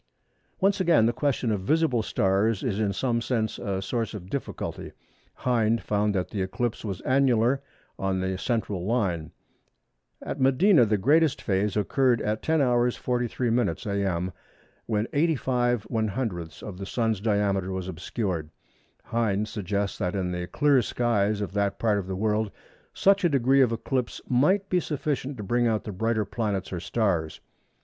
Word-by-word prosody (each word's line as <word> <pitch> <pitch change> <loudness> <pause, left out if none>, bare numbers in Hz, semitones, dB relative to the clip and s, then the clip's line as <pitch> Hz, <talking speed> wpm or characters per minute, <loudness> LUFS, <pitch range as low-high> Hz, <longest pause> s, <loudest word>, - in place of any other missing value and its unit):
Once 195 +1 +2
again 165 -11 +4
the 120 - +2
question 130 -2 0
of 100 -3 -1
visible 150 +1 +2
stars 100 +2 +1
is 110 -5 -1
in 105 -2 +1
some 115 +2 0
sense 115 -3 -1
a 95 -1 -2
source 115 +2 -2
of 95 -2 -9
difficulty. 140 - -5 0.4
Hind 115 -2 +1
found 105 0 0
that 90 -2 -1
the 100 - -3
eclipse 110 +5 -2
was 100 -5 -4
annular 130 -1 +2 0.4
on 95 -1 0
the 95 0 -1
central 105 -7 -1
line. 90 -7 -1 0.9
At - - -5
Medina 135 - +5
the 105 0 +2
greatest 150 +8 +3
phase 100 +1 0
occurred 120 +4 +2
at 105 +1 -1
10h. 125 -6 +2
43m. 120 0 0 0.2
a.m. 90 -1 -1 0.5
when 110 -1 0
85/100ths 120 - -1
of 95 -3 -7
the 100 - -5
Sun's 110 -4 0
diameter 100 -3 +1
was 95 -1 -4
obscured. 90 -2 -3 0.5
Hind 110 -3 0
suggests 100 -1 -2
that 90 -2 -1
in 90 -2 -1
the 90 0 -3
clear 145 +1 +3
skies 105 -3 0
of 100 -2 -4
that 100 -1 0
part 105 -3 +1
of 95 - -6
the 95 - -3
world 105 +1 0 0.4
such 195 0 +3
a 175 - +4
degree 135 -1 +3
of 125 -3 +4
eclipse 120 +2 -2
might 185 +11 +3
be 180 - +2
sufficient 145 -4 -3
to 105 - -5
bring 120 +4 +1
out 110 -2 0
the 105 - -5
brighter 110 +2 0
planets 100 -3 -3
or 90 - -2
stars. 85 -6 -1
110 Hz, 155 wpm, -26 LUFS, 100-125 Hz, 0.9 s, Medina